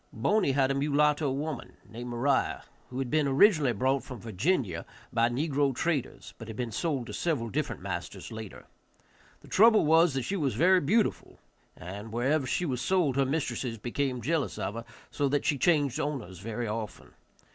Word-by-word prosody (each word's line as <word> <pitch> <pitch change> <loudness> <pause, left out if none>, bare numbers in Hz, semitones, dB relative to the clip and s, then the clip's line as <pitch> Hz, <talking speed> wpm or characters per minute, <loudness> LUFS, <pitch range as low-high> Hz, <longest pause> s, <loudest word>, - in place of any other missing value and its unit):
Boney 140 - +1
had 135 -1 +2
a - - +2
mulatto 145 +1 +2
woman, 145 0 -5
named 120 +2 -7
Moriah, 130 +3 0 0.3
who 125 - -7
had 130 -2 -3
been 155 -2 +2
originally 145 - +4
brought 130 +5 +1
from 125 -3 -8
Virginia 110 - -1 0.3
by 115 0 +3
negro 140 +1 0
traders, 160 -4 -2
but 115 - -9
had 110 -2 -7
been 120 -2 -3
sold 140 +1 -1
to - - -8
several 130 -10 -1
different - - -3
masters - - -5
later. 110 -3 -8 0.8
The - - -16
trouble 220 -2 +5
was 160 -1 +4
that 135 - -1
she 195 - -2
was 145 -8 -1
very 185 +3 +5
beautiful, 210 +10 0 0.4
and 100 +5 -8
wherever 130 +4 +1
she 175 - 0
was 125 -5 -2
sold 175 -7 +1
her 135 -1 +2
mistresses 135 -5 -2
became 125 +3 -2
jealous 155 +1 -1
of - - -3
her, 115 +1 -6 0.3
so 140 -1 0
that 145 0 0
she 145 - +1
changed 145 -4 +2
owners 130 - -4
very 115 +3 -4
often. 110 0 -6
135 Hz, 180 wpm, -29 LUFS, 120-150 Hz, 0.8 s, trouble